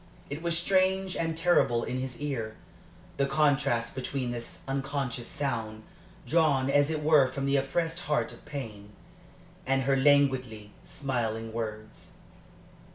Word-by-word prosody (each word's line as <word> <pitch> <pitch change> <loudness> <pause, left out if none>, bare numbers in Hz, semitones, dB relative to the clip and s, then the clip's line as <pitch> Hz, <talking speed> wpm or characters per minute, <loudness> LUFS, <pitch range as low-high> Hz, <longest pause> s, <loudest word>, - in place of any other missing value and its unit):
It 145 +3 -4
was 170 -1 0
strange 190 +1 +2
and 165 -1 -1
terrible 165 -9 +3
in 130 - -3
his 130 -1 -5
ear 120 -7 -3 0.6
the 140 - +2
contrast 140 -5 +2
between 130 -1 -3
this 120 -1 -6
unconscious 135 -3 -2
sound, 110 -6 -3 0.4
drawn 145 -5 +3
as 145 +1 +4
it 155 -1 -2
were 150 -3 +6
from 135 +1 -4
the 140 0 +2
oppressed 160 +5 -1
heart 150 0 0
of - - -15
pain, 105 -8 -7 0.7
and 135 0 +1
her 135 +1 +2
languidly, 130 -6 +2
smiling 115 -5 -3
words. 110 -1 -6
135 Hz, 135 wpm, -29 LUFS, 120-150 Hz, 0.7 s, were